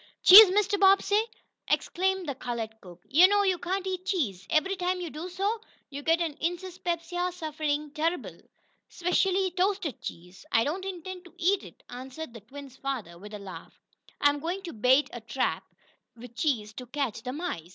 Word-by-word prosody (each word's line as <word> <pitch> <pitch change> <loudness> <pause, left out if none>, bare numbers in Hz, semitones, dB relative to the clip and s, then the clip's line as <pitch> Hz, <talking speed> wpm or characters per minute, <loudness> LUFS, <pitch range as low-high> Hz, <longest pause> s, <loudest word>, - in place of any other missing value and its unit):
"Cheese, 400 +2 +11
Massa 410 +1 +1
Bobbsey!" 395 +1 +5 0.5
exclaimed 380 -1 0
the 280 - -2
colored 235 -3 -4
cook. 180 -1 -14
"Yo' 340 +7 +7
knows 405 +1 +2
yo' 360 -2 0
cain't 375 +2 -2
eat 370 -1 -3
cheese. 225 - -2
Ebery 380 +5 +1
time 365 0 -1
yo' 345 -3 -5
does, 350 +4 -8 0.5
yo' 285 +1 -6
gits 325 +3 +3
de 335 -3 -2
insispepsia 355 0 -2
suffin 305 -3 -3
terrible 330 +3 -2 0.5
specially 370 +1 +1
toasted 365 - -1
cheese." 180 +2 -9
"I 225 - +4
don't 355 +8 -3
intend 370 -1 -7
to 350 - -16
eat 375 +2 +2
it!" - - -14
answered 260 +3 -8
the 230 - -10
twins' 265 +4 -12
father, 230 -12 -5
with 210 +2 -9
a - - -5
laugh. 200 -2 -11 0.4
"I'm 290 0 +3
going 350 +6 -4
to 345 - -7
bait 255 +6 +3
a 240 - -7
trap 225 +4 -2 0.5
with 235 0 -12
cheese 235 -6 -1
to 250 - -7
catch 255 -4 -3
the 250 - -5
mice. 285 - -5
320 Hz, 170 wpm, -28 LUFS, 250-370 Hz, 0.5 s, Cheese